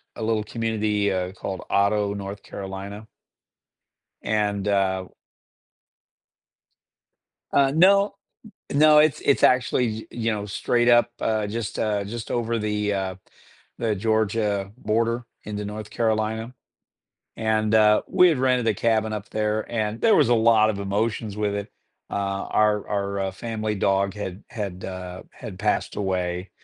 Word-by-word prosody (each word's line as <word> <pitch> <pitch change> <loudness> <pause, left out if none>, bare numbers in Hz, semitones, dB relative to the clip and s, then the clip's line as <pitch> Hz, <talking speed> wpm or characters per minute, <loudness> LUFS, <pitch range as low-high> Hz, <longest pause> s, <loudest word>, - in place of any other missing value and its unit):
a 110 - -5
little 110 -1 0
community, 105 -2 -1
uh, 90 0 -2
called 95 -1 -5
Otto, 100 0 +2
North 100 0 -6
Carolina. 100 +2 -7 1.2
And, 105 -2 -1
uh, 95 -2 +1
w - - -29 2.4
Uh, 135 -1 +4
no. 200 +4 +5 0.6
No, 150 +1 +6
it's 150 -1 +4
it's 140 - +2
actually, 125 -1 +3
y 110 +1 -7
you 115 -1 -1
know, 105 -1 -3
straight 120 +4 +1
up, 120 -1 +5
uh, 110 -1 0
just, 110 0 -4
uh, 105 -2 0
just 110 +2 -6
over 115 -1 0
the, 105 -1 -1
uh, 95 -1 -2 0.6
the 110 -2 0
Georgia 105 -1 0
border 115 +1 0 0.2
into 105 -1 -4
North 105 0 -7
Carolina 110 +1 -1 0.8
And, 110 -1 +1
uh, 105 -1 +5
we 180 0 +5
had 155 -6 0
rented 125 -2 +2
a 110 - +3
cabin 110 +1 +1
up 105 -1 -5
there, 110 0 -1
and 110 -1 -2
there 225 - +5
was 145 -6 +4
a 120 - +5
lot 110 -1 +4
of 100 - -6
emotions 105 +1 -2
with 105 -1 0
it, 100 +1 -5 0.4
uh, - - -7
our 100 +1 0
our, 100 -1 -1
uh, 95 - -4
family 110 +1 -3
dog 100 0 +1
had 100 -1 -6
had, 100 -5 -5
uh, 90 -1 -6
had - - -9
passed - - 0
away, 90 -2 -2
105 Hz, 145 wpm, -24 LUFS, 100-115 Hz, 2.4 s, No